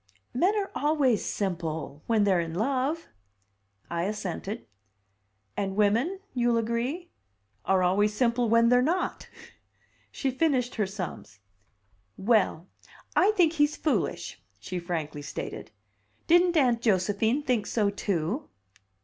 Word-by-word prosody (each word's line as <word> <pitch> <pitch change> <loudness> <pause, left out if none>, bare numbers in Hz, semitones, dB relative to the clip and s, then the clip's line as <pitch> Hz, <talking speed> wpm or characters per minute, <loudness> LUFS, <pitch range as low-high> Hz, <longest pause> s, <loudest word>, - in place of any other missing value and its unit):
"Men 365 - +2
are 395 -1 -2
always 285 -7 +2
simple 160 -6 -3
when 225 -3 +3
they're 190 -3 +3
in 165 -1 -3
love." 270 - -1 0.8
I 170 0 -2
assented. 200 - -4 0.9
"And 195 -1 -2
women 230 - +2
you'll 240 -2 +2
agree? 235 +10 -2 0.5
are 190 -1 +3
always 200 +4 +3
simple 235 +1 +1
when 230 +1 +5
they're 245 0 +5
not!" 335 +8 -1 0.8
She 270 - -2
finished 260 -3 +1
her 210 -3 0
sums. 180 - -7 0.8
"Well, 200 -5 +2 0.5
I 385 - +5
think 335 -3 +4
he's 295 -1 +2
foolish!" 310 - -1 0.2
she 185 -1 -5
frankly 160 -4 -4
stated. - - -6 0.6
"Didn't 350 0 +4
Aunt 245 -5 +3
Josephine 215 +6 +1
think 245 -6 0
so, 210 -3 +1
too?" 200 - -2
230 Hz, 120 wpm, -27 LUFS, 190-275 Hz, 0.9 s, when